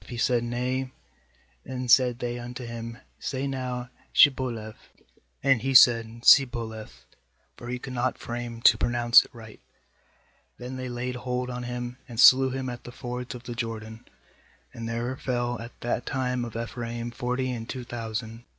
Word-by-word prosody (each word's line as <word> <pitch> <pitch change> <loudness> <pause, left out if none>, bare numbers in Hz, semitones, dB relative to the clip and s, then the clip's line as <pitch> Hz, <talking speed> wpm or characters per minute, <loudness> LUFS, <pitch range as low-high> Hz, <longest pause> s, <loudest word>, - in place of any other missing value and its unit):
If - - -17
he 120 - -6
said: 120 0 +2
'Nay'; 125 +2 -2 0.7
^hen 130 -1 -5
said 125 -1 +5
they 120 -1 -3
unto 120 +1 -7
him: 115 0 -7 0.2
'Say 135 0 -3
now 125 -2 -4 0.2
Shibboleth'; 120 -6 +2 0.5
and 135 -4 +4
he 135 +2 -1
said 115 -1 +6
'Sibboleth'; 110 - +3 0.5
for 120 - -10
he 125 - -2
could 130 +1 -8
not 125 +1 -1
frame 120 -1 -6
to - - +7
pronounce 120 0 +5
it - - -16
right; 110 -2 -12 1.0
then 125 +1 -7
they 130 -1 -5
laid 125 +1 -4
hold 125 0 -3
on 125 0 -5
him, 125 0 -5
and 115 -2 -7
slew 130 +1 +8
him 130 0 -4
at 120 -1 -6
the 120 - -9
fords 125 0 -6
of 120 - -10
the 120 - -6
Jordan; 110 -1 -5 0.7
and 115 0 -6
there 120 +3 -2
fell 120 -2 -2
at 115 +1 -11
that 120 +1 -2
tune 125 -2 -1
of 115 - -9
Ephraim 115 0 -5
forty 125 +1 -2
and 115 -1 -6
two 130 -2 -5
thousand. 115 -1 -5
120 Hz, 170 wpm, -26 LUFS, 115-125 Hz, 1.0 s, slew